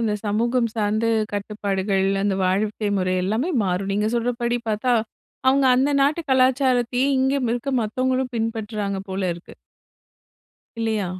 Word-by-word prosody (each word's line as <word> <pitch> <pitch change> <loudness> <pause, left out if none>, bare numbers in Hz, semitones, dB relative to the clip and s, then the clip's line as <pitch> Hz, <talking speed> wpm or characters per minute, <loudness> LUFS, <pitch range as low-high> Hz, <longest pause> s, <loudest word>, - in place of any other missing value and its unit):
அந்த 220 -2 0
சமூகம் 235 +3 +1
சார்ந்த 215 +1 0 0.3
கட்டுப்பாடுகள், 200 -1 -1 0.2
அந்த 200 -1 +1
வாழ்க்கை 210 +3 0
முறை 185 0 0
எல்லாமே 225 - 0
மாறும். 190 +1 -1
நீங்க 210 +2 +1
சொல்றபடி 240 0 0
பாத்தா, 220 +4 0 0.6
அவங்க 270 0 +4
அந்த 270 +3 +2
நாட்டு 295 +4 +2
கலாச்சாரத்தையே, 255 -1 +2
இங்கேயும் 265 -2 +1
இருக்க 245 +3 -2
மத்தவங்களும் 255 +3 -1
பின்பற்றுறாங்க 215 -3 -2
போல 190 +1 -3
இருக்கு. 170 - -13 1.3
இல்லையா? 220 -3 0
225 Hz, 125 wpm, -22 LUFS, 205-255 Hz, 1.3 s, அவங்க